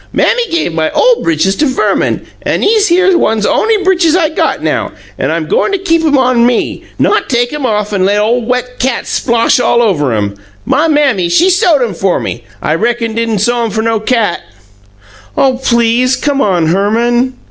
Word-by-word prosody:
"Mammy 480 Hz, -1 st, +1 dB
gave 330 Hz, -, -1 dB
my 160 Hz, -1 st, 0 dB
OLE 485 Hz, 0 st, +3 dB
britches 165 Hz, +4 st, 0 dB
to 300 Hz, -, +1 dB
Verman, 260 Hz, -, -1 dB, 0.2 s
an' -, -, -1 dB
'ese 425 Hz, 0 st, +3 dB
here 370 Hz, +2 st, +3 dB
ones 220 Hz, -10 st, +1 dB
on'y 435 Hz, -2 st, +1 dB
britches 360 Hz, -4 st, +2 dB
I 335 Hz, -4 st, +2 dB
got 315 Hz, -, -2 dB
now, -, -, -2 dB, 0.3 s
an' -, -, -1 dB
I'm -, -, -2 dB
go' 475 Hz, +4 st, +1 dB
to 400 Hz, -, -1 dB
keep 330 Hz, -3 st, 0 dB
'em 295 Hz, -3 st, +2 dB
on 255 Hz, -2 st, +2 dB
me 240 Hz, -1 st, -1 dB
not -, -, 0 dB
take 245 Hz, +1 st, 0 dB
'em 290 Hz, -3 st, -2 dB
off 210 Hz, -2 st, -2 dB
an' 190 Hz, -2 st, 0 dB
let 200 Hz, +2 st, +1 dB
ole 225 Hz, +4 st, +1 dB
wet 250 Hz, +1 st, -3 dB
cat 255 Hz, -1 st, -1 dB
splosh 235 Hz, 0 st, +1 dB
all 240 Hz, -, +2 dB
over 170 Hz, -, +1 dB
'em. 100 Hz, -2 st, -2 dB, 0.3 s
My 275 Hz, +6 st, +1 dB
Mammy, 275 Hz, -, +1 dB
she 350 Hz, -, +3 dB
sewed 350 Hz, -, +2 dB
'em 225 Hz, -5 st, -3 dB
fer 185 Hz, +1 st, 0 dB
ME, 120 Hz, -, -5 dB, 0.2 s
I 155 Hz, -, 0 dB
reckon 230 Hz, +5 st, -1 dB
d'in' 230 Hz, -1 st, -1 dB
sew 240 Hz, +4 st, 0 dB
'em 230 Hz, -, -1 dB
fer 220 Hz, +1 st, -2 dB
no 225 Hz, -1 st, 0 dB
cat!" 220 Hz, -4 st, -1 dB, 1.0 s
"Oh, 260 Hz, -2 st, +2 dB
PLEASE, 235 Hz, +1 st, +2 dB
come 285 Hz, 0 st, -1 dB
on, 180 Hz, -7 st, +1 dB
Herman!" 235 Hz, +7 st, 0 dB
240 Hz, 195 wpm, -11 LUFS, 210-300 Hz, 1.0 s, OLE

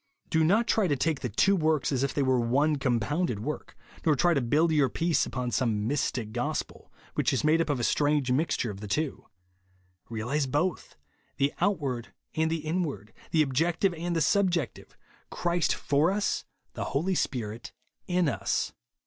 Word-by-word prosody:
Do 160 Hz, 0 st, +3 dB
not 205 Hz, +9 st, +3 dB
take 160 Hz, -, +1 dB
the 125 Hz, -, -3 dB
two 195 Hz, -, +3 dB
works 155 Hz, -5 st, +1 dB
as 130 Hz, -2 st, 0 dB
if 140 Hz, -, +1 dB
they 145 Hz, -, 0 dB
were 130 Hz, -1 st, +3 dB
one 140 Hz, +6 st, +2 dB
com 125 Hz, -4 st, +1 dB
pounded 145 Hz, -, -1 dB
work; 150 Hz, +7 st, -5 dB, 0.3 s
nor 155 Hz, -2 st, +4 dB
try 175 Hz, +5 st, +3 dB
to 140 Hz, -, +1 dB
build 150 Hz, +8 st, +2 dB
your 145 Hz, -4 st, +3 dB
peace 165 Hz, -1 st, +1 dB
upon 125 Hz, -1 st, -3 dB
some 110 Hz, -4 st, 0 dB
mystic 125 Hz, -5 st, -1 dB
gospel 120 Hz, +2 st, -4 dB, 0.2 s
which -, -, +1 dB
is -, -, 0 dB
made 155 Hz, +2 st, +4 dB
up 165 Hz, -, -2 dB
of 145 Hz, -3 st, 0 dB
a -, -, -2 dB
strange 145 Hz, -1 st, +2 dB
mixture 130 Hz, -4 st, 0 dB
of 100 Hz, -, -9 dB
the 105 Hz, -, -7 dB
two. 145 Hz, +8 st, -2 dB, 0.8 s
Realise 120 Hz, +6 st, -1 dB
both, 150 Hz, +5 st, -1 dB, 0.4 s
tfi3 140 Hz, +1 st, +2 dB
outward 145 Hz, -, -1 dB, 0.2 s
and 160 Hz, 0 st, +1 dB
the 160 Hz, -1 st, -2 dB
inward; 155 Hz, -, -2 dB, 0.2 s
the 155 Hz, -2 st, +4 dB
objective 165 Hz, +7 st, +1 dB
and 170 Hz, +1 st, -3 dB
the 165 Hz, -, +1 dB
subjective; 175 Hz, -, 0 dB, 0.3 s
Christ 175 Hz, -1 st, 0 dB
for 145 Hz, +4 st, +2 dB
us, 200 Hz, +1 st, -1 dB, 0.3 s
the -, -, -4 dB
Holy 185 Hz, +6 st, 0 dB
Spirit 115 Hz, -, -3 dB, 0.4 s
in 180 Hz, -2 st, +2 dB
us. 140 Hz, -, -1 dB
150 Hz, 175 wpm, -28 LUFS, 125-165 Hz, 0.8 s, nor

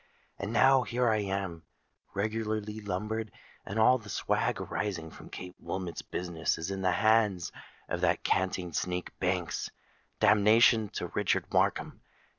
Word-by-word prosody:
And 100 Hz, +2 st, -3 dB
now—here 125 Hz, -1 st, +4 dB
I 110 Hz, -1 st, +3 dB
am, 95 Hz, -4 st, -3 dB, 0.5 s
regularly 110 Hz, 0 st, -2 dB
lumbered; 105 Hz, +3 st, -3 dB, 0.4 s
and 100 Hz, -, -4 dB
all 125 Hz, +3 st, +5 dB
the 105 Hz, -2 st, -12 dB
swag -, -, 0 dB
arising 85 Hz, -6 st, -3 dB
from -, -, -12 dB
Kate 90 Hz, -1 st, -8 dB
Wilmot's 90 Hz, -3 st, -4 dB
business 85 Hz, -2 st, -2 dB
is 80 Hz, +4 st, -4 dB
in 95 Hz, 0 st, -3 dB
the 95 Hz, -1 st, +2 dB
hands 105 Hz, -5 st, +3 dB, 0.4 s
of -, -, -3 dB
that -, -, +2 dB
canting 90 Hz, -2 st, 0 dB
sneak 90 Hz, +3 st, -2 dB
Banks! 90 Hz, -2 st, -1 dB, 0.5 s
Damnation 110 Hz, +1 st, +5 dB
to -, -, -3 dB
Richard -, -, 0 dB
Markham! -, -, +1 dB
100 Hz, 135 wpm, -30 LUFS, 90-110 Hz, 0.5 s, all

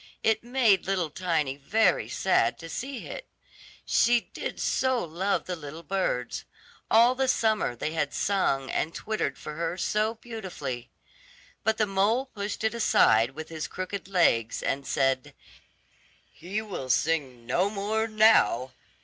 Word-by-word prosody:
It 220 Hz, 0 st, +2 dB
made 240 Hz, -7 st, +3 dB
little 180 Hz, -5 st, 0 dB
Tiny 155 Hz, -5 st, -1 dB
very 215 Hz, +10 st, +2 dB
sad 190 Hz, -, +2 dB
to 165 Hz, -, -9 dB
see 265 Hz, +6 st, -5 dB
it, -, -, -8 dB, 0.6 s
she 240 Hz, 0 st, +4 dB
did -, -, -5 dB
so 260 Hz, -5 st, +1 dB
love 180 Hz, +5 st, -1 dB
the 180 Hz, -, -3 dB
little 160 Hz, +1 st, -9 dB
birds; 165 Hz, -9 st, -2 dB, 0.5 s
all 235 Hz, +3 st, +6 dB
the 265 Hz, +1 st, 0 dB
summer 220 Hz, -, +1 dB
they 150 Hz, -, -3 dB
had 150 Hz, -3 st, -1 dB
sung 160 Hz, -9 st, 0 dB
and 160 Hz, -, -1 dB
twittered 215 Hz, -11 st, -2 dB
for 150 Hz, -, -7 dB
her 170 Hz, +2 st, -3 dB
so 215 Hz, +4 st, 0 dB
beautifully. 190 Hz, -, -6 dB, 0.7 s
But 220 Hz, +1 st, +1 dB
the 215 Hz, -, +3 dB
mole 205 Hz, +6 st, +1 dB
pushed 205 Hz, -4 st, -5 dB
it 220 Hz, 0 st, +1 dB
aside 130 Hz, -, +3 dB
with 160 Hz, 0 st, -7 dB
his 160 Hz, -3 st, -4 dB
crooked 185 Hz, +1 st, -5 dB
legs, 165 Hz, -, +2 dB
and 140 Hz, 0 st, -2 dB
said, 135 Hz, -1 st, 0 dB, 1.0 s
"He 200 Hz, +5 st, -4 dB
will 180 Hz, -11 st, -6 dB
sing 135 Hz, -4 st, 0 dB
no 175 Hz, +11 st, +1 dB
more 215 Hz, +2 st, -1 dB
now. 215 Hz, -, +4 dB
190 Hz, 145 wpm, -27 LUFS, 150-220 Hz, 1.0 s, all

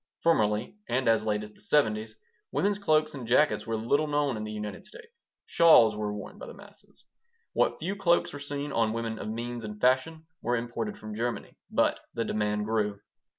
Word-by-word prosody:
Formerly, 110 Hz, -, +2 dB
and 130 Hz, +1 st, 0 dB
as 110 Hz, -1 st, +3 dB
late 105 Hz, -1 st, 0 dB
as 105 Hz, -, -9 dB
the -, -, -23 dB
'70's, 110 Hz, -3 st, +1 dB, 0.4 s
women's 205 Hz, 0 st, +1 dB
cloaks 155 Hz, -5 st, +2 dB
and 130 Hz, -5 st, -7 dB
jackets 130 Hz, +3 st, +3 dB
were 115 Hz, -, -1 dB
little 130 Hz, +8 st, +1 dB
known 145 Hz, -3 st, +1 dB
in 110 Hz, -, -4 dB
the 110 Hz, -, -5 dB
United 105 Hz, -1 st, -6 dB
States. 470 Hz, -1 st, -15 dB, 0.2 s
Shawls 120 Hz, -10 st, +6 dB
were 105 Hz, -1 st, -2 dB
worn 105 Hz, 0 st, -8 dB
by -, -, -8 dB
the 475 Hz, -, -9 dB
masses. -, -, -15 dB, 0.5 s
What -, -, +2 dB
few 185 Hz, +5 st, -3 dB
cloaks 175 Hz, -3 st, +2 dB
were 145 Hz, -, -6 dB
seen 145 Hz, 0 st, -4 dB
on 115 Hz, -3 st, +1 dB
women 115 Hz, -1 st, -3 dB
of -, -, -5 dB
means 120 Hz, +1 st, -4 dB
and 105 Hz, -1 st, -7 dB
fashion 130 Hz, +6 st, +1 dB, 0.2 s
were 120 Hz, +1 st, 0 dB
imported 120 Hz, -, -4 dB
from 110 Hz, 0 st, -8 dB
Germany. 120 Hz, +3 st, -3 dB
But -, -, +2 dB, 0.2 s
the 115 Hz, -, -1 dB
demand 105 Hz, -1 st, -1 dB
grew. 105 Hz, -2 st, 0 dB
120 Hz, 195 wpm, -28 LUFS, 110-155 Hz, 0.5 s, Shawls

